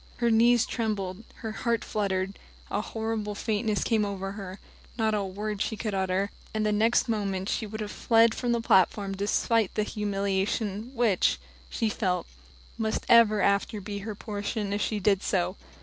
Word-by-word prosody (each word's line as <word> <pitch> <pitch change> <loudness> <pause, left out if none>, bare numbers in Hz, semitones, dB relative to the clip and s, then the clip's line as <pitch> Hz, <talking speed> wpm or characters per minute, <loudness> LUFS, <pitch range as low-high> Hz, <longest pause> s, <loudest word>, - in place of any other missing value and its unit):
Her 235 -1 +2
knees 235 +1 +5
trembled, 210 -4 -3 0.2
her 220 - -2
heart 230 +1 -1
fluttered, 195 -2 -1 0.3
a 205 - 0
horrible 220 -1 -3
faintness 215 0 0
came 220 -3 +2
over 195 -1 -3
her; 195 -2 -7 0.4
not 220 -2 +1
a 210 -1 +1
word 205 +2 -4
could - - -3 0.2
she 220 - -1
utter, 190 0 0 0.2
and 215 0 +1
the 210 - +2
next 225 +4 +3
moment 195 -4 -1
she 220 - -1
would 215 +1 -6
have 210 -1 -4
fled 230 -1 +4
from 245 0 -1
the 235 -1 +1
platform 195 -1 +3
despite 210 +1 +1
the 215 - +2
humiliation 205 +1 -1
which, 195 - +2 0.3
she 225 - -1
felt, 185 -5 -1 0.5
must 220 -1 -1
ever 215 -4 +6
after 200 +1 +1
be 205 +1 -5
her 210 +1 -5
portion 205 0 -3
if 205 - -1
she 215 - 0
did 200 0 +2
so. 185 -1 0
210 Hz, 170 wpm, -28 LUFS, 195-220 Hz, 0.5 s, ever